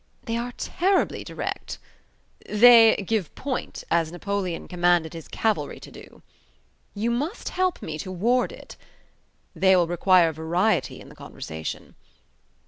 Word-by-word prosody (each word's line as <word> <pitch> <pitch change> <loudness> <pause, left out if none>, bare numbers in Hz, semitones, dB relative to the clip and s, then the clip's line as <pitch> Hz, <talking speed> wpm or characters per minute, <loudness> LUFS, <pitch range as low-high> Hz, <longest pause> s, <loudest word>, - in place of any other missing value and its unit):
"They 230 -2 -3
are 240 +1 -3
terribly 375 +2 0
direct." - - -5 0.7
"They 225 +1 +7
'give 210 -5 -2
point', 265 -2 -5
as 165 -2 +1
Napoleon 185 -1 -4
commanded 175 -2 +1
his 165 -2 -9
cavalry 220 -1 -2
to - - -12
do." - - -15 0.7
"You 225 +3 -1
must 290 - -3
help 370 -1 -1
me 155 -1 -5
to 185 - -6
ward 235 +8 +1
it." - - -12 0.8
"They 190 +3 +4
will 175 -2 +3
require 175 0 +3
variety 170 +7 0
in - - -13
the - - -15
conversation." 80 0 -7
190 Hz, 135 wpm, -24 LUFS, 170-235 Hz, 0.8 s, They